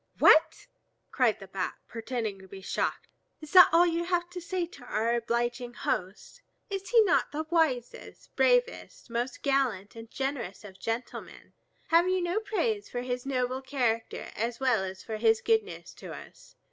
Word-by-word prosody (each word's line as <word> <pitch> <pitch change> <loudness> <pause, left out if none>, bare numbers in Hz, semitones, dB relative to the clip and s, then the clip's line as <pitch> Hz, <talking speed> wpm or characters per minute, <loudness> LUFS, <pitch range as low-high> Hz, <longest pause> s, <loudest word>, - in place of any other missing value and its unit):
"What!" 315 - +5 0.5
cried 245 -5 +2
the 195 - -9
Bat, 190 -1 -3
pretending 225 -3 -4
to 190 - -14
be 195 +1 -10
shocked. 190 - -2 0.3
"Is 310 -1 -11
that 365 -1 +9
all 340 +2 +6
you 340 0 0
have 350 -1 -1
to 360 0 -6
say 360 0 -2
to 285 -6 -14
our 230 0 0
obliging 240 +1 -1
host? 195 - -4 0.3
Is 390 -1 -4
he 460 -2 +6
not 375 - +2
the 310 +2 -3
wisest, 295 -8 -1
bravest, - - +1
most 245 +2 -3
gallant 255 -9 0
and 225 0 -10
generous 265 -9 -4
of 190 -2 -12
gentlemen? 230 +4 -6 0.4
Have 335 +2 +4
you 370 0 +2
no 350 +3 0
praise 435 0 -2
for 245 0 -4
his 250 +1 -4
noble 255 -1 -1
character 245 -4 -2
as 230 +2 -2
well 250 -7 +2
as 190 0 -6
for 220 -1 -5
his 225 0 +3
goodness 445 -2 -1
to - - -10
us? - - -14
255 Hz, 170 wpm, -29 LUFS, 225-345 Hz, 0.5 s, that